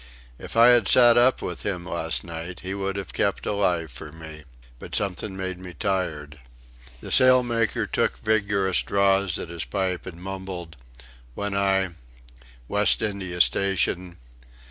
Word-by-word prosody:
If - - -7
I 115 +1 +8
had 120 -5 +4
sat 120 -2 +7
up 125 +2 +3
with 90 - -5
him 90 -4 -4
last 80 -2 -1
night 85 +1 -7
he 95 +1 -5
would 100 0 -3
have 100 -4 -6
kept - - -1
alive 90 -6 0
for 75 +5 -9
me... 80 -1 -11 0.3
but - - -6
something 95 0 -1
made 95 -1 -4
me 90 -1 -10
tired." 80 -8 -3 0.6
The - - -8
sailmaker 125 -4 +3
took - - -1
vigorous 100 -3 +1
draws 100 -2 +1
at - - -6
his 85 -1 -4
pipe 95 -2 -3
and 85 -2 -9
mumbled: 95 -3 -7 0.6
"When 100 -1 -3
I... 95 -1 +1 0.8
West 105 +5 +2
India 95 -4 -4
Station... 90 -2 +1
95 Hz, 145 wpm, -24 LUFS, 85-100 Hz, 0.8 s, I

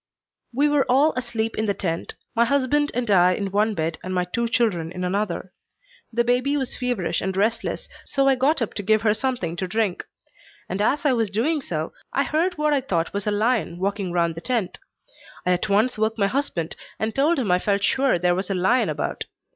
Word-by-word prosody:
"We 280 +5 +2
were 290 -3 +2
all 280 +5 +4
asleep 225 -3 -2
in 220 - 0
the 200 - +1
tent, 170 -3 -3 0.2
my 230 - +4
husband 280 +3 +2
and 245 -1 -1
I 180 -1 +5
in 195 0 -3
one 210 +2 +1
bed 160 -1 -2
and 185 0 -3
my 180 0 +1
two 235 +6 -1
children 200 -9 0
in 180 0 -5
another. 185 0 -2 0.6
The 235 +1 +2
baby 250 +4 +1
was 265 -3 -3
feverish 245 -8 -1
and 190 0 -2
restless, 225 +3 -1 0.2
so 275 0 +1
I 270 - +6
got 265 +1 +2
up 220 - -5
to - - -3
give 215 +2 +2
her 210 -2 +4
something 220 -9 -2
to 185 - -2
drink; 205 -1 -1 0.6
and 190 +3 -2
as 280 +8 +1
I 280 - +4
was 225 -4 +1
doing 275 +10 0
so, 160 -9 -4 0.2
I 275 - +1
heard 335 +5 0
what 300 0 +2
I 280 - +2
thought 170 -10 -1
was 200 +1 -3
a - - +2
lion 210 -4 0
walking 195 0 -2
round 170 -1 +1
the 165 - -8
tent. 230 -6 -2 0.7
I 180 - +2
at 180 +3 0
once 215 +4 +2
woke 220 +1 +1
my 200 - +2
husband 195 - -2 0.2
and 220 0 -2
told 305 +5 +2
him 230 -9 0
I 180 - +4
felt 200 +1 0
sure 265 +1 +3
there 175 +1 +2
was 185 +2 -2
a 195 - 0
lion 190 +8 +2
about. - - -3
220 Hz, 220 wpm, -23 LUFS, 185-255 Hz, 0.7 s, I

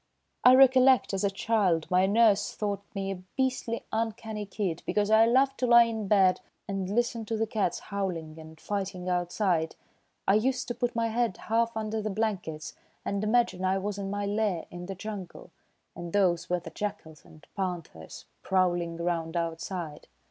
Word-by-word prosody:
I 250 +1 +8
recollect, 260 -2 +5
as 195 +1 -1
a 200 - +3
child, 195 -5 +1
my 185 +1 +4
nurse 210 0 +3
thought 205 -2 -2
me 195 0 -2
a 185 -2 -6 0.2
beastly 255 -3 -1
uncanny 220 -1 -3
kid 185 -4 -3
because 210 0 +1
I 220 +1 +6
loved 270 +3 +3
to 250 - +1
lie 235 0 +8
in 225 -3 -3
bed 190 -2 +4 0.3
and 195 -2 -3
listen 235 +2 0
to 225 +1 -2
the 225 - +1
cats 210 -5 -1
howling 170 -6 -4
and 160 0 -12
fighting 190 -2 -4
outside. 175 -2 0 0.5
I 195 - +5
used 250 +5 +1
to - - -1
put 240 0 -2
my 230 0 +1
head 230 -3 0
half 230 +1 0
under 220 0 -2
the 215 - -2
blankets 190 -8 -3 0.3
and 200 +1 -2
imagine 215 -4 +1
I 190 +1 +2
was 200 +1 -3
in 195 -1 -4
my 205 0 -2
lair 205 -4 -1
in 175 0 -8
the 195 - -5
jungle, 195 -2 -8 0.4
and 170 -1 -7
those 180 -4 +2
were 180 0 +1
the 170 -1 -10
jackals 160 -7 -6
and 155 -2 -17
panthers 175 - -5 0.2
prowling 175 -3 0
around 170 -1 -2
outside." 165 -1 -4
200 Hz, 175 wpm, -28 LUFS, 180-220 Hz, 0.5 s, I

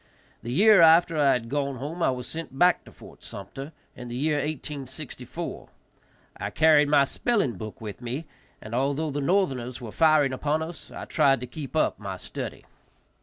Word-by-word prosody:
The 120 - -5
year 205 - +6
after 165 +1 +6
I 145 -3 +4
had 115 -2 -2
gone 140 +1 -1
home 150 +7 -6
I - - +3
was 125 -1 -3
sent 160 -4 -7
back 180 +3 +4
to - - -14
Fort - - -15
Sumpter 135 +9 -8 0.2
in 125 - -8
the 120 - -6
year 150 +2 +1
1864. 145 0 -5 0.7
I - - -3
carried 155 -2 +4
my 145 -2 +5
spelling 205 - 0
book 110 -2 -8
with 110 +1 -8
me, 125 +7 -4 0.4
and, 110 - -8
although 140 +5 0
the 145 +1 -2
northerners 135 -8 0
were 115 -4 -8
firing 155 -3 +4
upon 150 +4 0
us, 165 0 -9
I - - -8
tried 135 -2 +3
to - - -3
keep 135 +1 -8
up - - +1
my - - -5
study. - - -7
140 Hz, 180 wpm, -26 LUFS, 125-160 Hz, 0.7 s, year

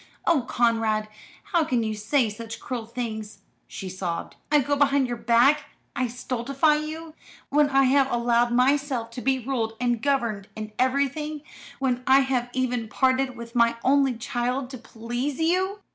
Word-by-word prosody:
"Oh 335 -5 +3
Conrad! 225 -2 +1 0.3
How 345 -5 +1
can 250 -6 0
you 220 -1 -2
say 220 +4 +1
such 225 +2 -7
cruel 240 -4 -5
things?" 220 -3 -6 0.2
she 195 - -7
sobbed. 180 -2 -4 0.2
"I 300 - +6
go 285 +1 0
behind 280 -2 +3
your 240 - -3
back! 250 +6 +3 0.3
I 255 - 0
stultify 260 +5 0
you! 310 +1 -6 0.4
When 295 0 +3
I 270 0 +4
have 270 +1 +3
allowed 240 0 +2
myself 255 -1 +1
to 245 - -7
be 265 +1 +2
ruled 230 -3 -3
and 240 -2 0
governed 235 -8 0
in 215 0 -6
everything! 280 +3 0 0.4
When 255 -2 0
I 265 +1 +6
have 255 -2 -1
even 245 -3 -1
parted 260 +1 +1
with 235 0 -9
my 235 -1 +3
only 270 -1 +3
child 250 +2 -2
to 255 - -7
please 240 +5 -4
you!" 375 +5 +1
250 Hz, 160 wpm, -25 LUFS, 230-275 Hz, 0.4 s, I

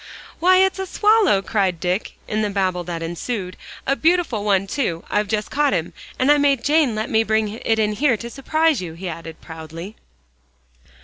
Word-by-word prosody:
"Why, 370 +3 +5
it's 380 0 +3
a 385 - -3
swallow," 415 - +3
cried 190 -6 0
Dick, 180 +4 -2
in 215 0 -1
the 210 - 0
babel 185 -3 -1
that 170 -1 -4
ensued, 180 +3 -4 0.3
"a 275 - +2
beautiful 320 - +1
one, 195 -2 +2
too. 190 - -2
I've 210 0 +1
just 215 0 -2
caught 290 0 +2
him, 170 -2 -2 0.2
and 260 +3 +3
I 295 - +5
made 280 -4 +2
Jane 290 -5 +3
let 215 +2 -2
me 220 0 +3
bring 220 -1 +1
it 225 +1 -1
in 215 -1 +1
here 245 +2 +2
to 235 +2 -7
surprise 310 0 +1
you," 170 -3 -6
he 185 +3 -6
added 165 -1 -7
proudly. 165 +5 -9
215 Hz, 190 wpm, -21 LUFS, 185-285 Hz, 0.3 s, Why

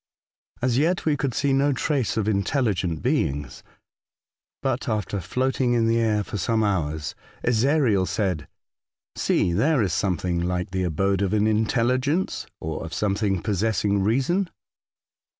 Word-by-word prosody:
As 125 0 +2
yet 175 +4 +1
we 155 -2 +3
could 135 -3 -2
see 140 -1 +1
no 140 +1 +3
trace 130 -3 0
of 110 -2 0
intelligent 100 - 0
beings; 70 -2 -1 1.0
but, - - -1
after 105 -2 -2
floating 125 +6 0
in 115 -1 +2
the 115 +1 +2
air 110 -2 +1
for 105 - -5
some 110 +5 +1
hours, 80 -7 -1 0.3
Ezariel 120 -5 +2
said: 90 -8 -1 0.4
'' - - -71 0.3
See, 85 - +1
there 135 - +3
is 95 -5 -1
something 90 -2 0
like 90 +2 -2
the 95 0 -1
abode 95 +4 0
of 100 -1 0
an 105 0 +3
intelligence, 125 - +1
or 80 0 -4
of 80 - -6
something 100 -2 0
possessing 105 -1 +1
reason." 135 - +1
105 Hz, 145 wpm, -24 LUFS, 95-130 Hz, 1.0 s, we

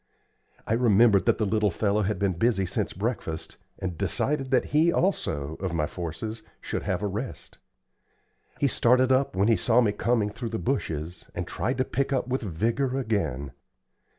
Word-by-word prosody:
I - - 0
remembered 110 -4 +4
that - - +4
the 110 - +1
little 105 +1 +2
fellow 100 +3 +1
had 105 0 0
been 100 -1 +1
busy 95 +2 +1
since 85 - -2
breakfast, 95 -6 -4 0.2
and 90 -4 -5
decided 135 -2 0
that 130 -1 +3
he 160 +3 +5
also, 80 - -1
of 95 -3 -2
my 75 -2 +1
forces, 90 +8 -5 0.2
should - - -3
have 95 +2 -2
a - - +1
rest. 110 +6 -6 1.0
He 140 - +3
started 125 +1 +3
up 130 -5 +2
when 100 +2 +2
he 115 - +5
saw 115 +6 +3
me 115 -4 +3
coming 105 0 0
through 115 +2 -5
the 110 - -3
bushes, 85 - -3
and - - -2
tried 125 +3 -2
to 130 - +1
pick 135 +5 -1
with 130 +2 -1
vigor 115 - -1
again. 100 - -1
110 Hz, 175 wpm, -27 LUFS, 95-125 Hz, 1.0 s, he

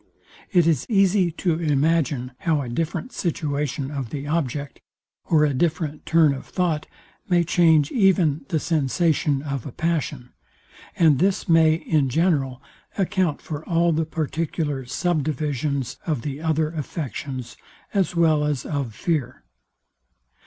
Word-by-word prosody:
It 175 -5 +4
is 160 -6 +1
easy 195 -3 +3
to 170 -1 0
imagine 145 -4 +1
how 155 -4 +1
a 125 - -6
different 165 - -3
situation 145 - -2
of 135 -5 -4
the 140 +2 -5
object, 145 -2 -2 0.4
or 155 -2 +4
a 145 - +1
different 155 +1 -1
turn 160 -3 +4
of 135 - -8
thought, 170 -4 -1 0.4
may 175 -1 +4
change 160 -3 +3
even 180 - +3
the 160 - +1
sensation 150 -1 +1
of 140 -4 -3
a - - -7
passion; 145 -5 -2 0.7
and 155 -5 +4
this 195 +3 +1
may 160 -2 +5
in 155 -4 0
general 140 -4 0 0.3
account 185 -5 0
for 155 -1 -5
all 170 0 +3
the 160 +1 0
particular 155 -3 -2
sub 165 +5 0
divisions 140 -2 -2
of 150 -8 -1
the 145 0 -5
other 160 -1 0
affections, 140 -5 -5 0.4
as 195 -3 +1
well 160 -3 +3
as 150 -4 -1
of 140 -7 -3
fear. 145 - -2
155 Hz, 140 wpm, -23 LUFS, 140-170 Hz, 0.7 s, may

